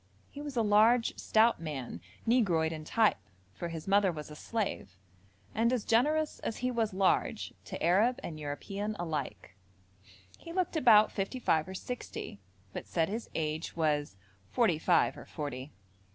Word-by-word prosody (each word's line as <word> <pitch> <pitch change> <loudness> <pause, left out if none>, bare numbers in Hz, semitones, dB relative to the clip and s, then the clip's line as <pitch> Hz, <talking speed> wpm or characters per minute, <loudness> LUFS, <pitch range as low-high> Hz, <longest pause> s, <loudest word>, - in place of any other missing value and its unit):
He 285 - -8
was 290 -3 -6
a 230 - +3
large, 220 +3 +4
stout 225 -3 +3
man, 135 - -5 0.2
negroid 185 -10 +3
in 155 -1 -6
type, 220 +5 +3 0.4
for 170 - -5
his 165 0 -7
mother 195 -1 +4
was 150 -2 -8
a - - -8
slave, 185 - -3 0.6
and 230 +2 +2
as 250 -4 -1
generous 300 +7 +2
as 225 - -4
he 255 - +1
was 230 -3 0
large, 190 0 +1
to - - -6
Arab 215 +10 +3
and 155 -2 -6
European 195 +9 -4
alike. 160 - -4 0.8
He 335 - -9
looked 365 -2 -1
about 220 -8 +6
fifty 195 +6 -3
five 160 -9 +1
or 190 - -7
sixty, 235 - -6 0.3
but - - -6
said 165 0 0
his 225 +3 -4
age 155 +1 -2
was 150 -8 0 0.3
'forty 205 -10 +2
five - - +3
or - - -12
forty.' 145 -2 -5
195 Hz, 160 wpm, -31 LUFS, 155-230 Hz, 0.8 s, about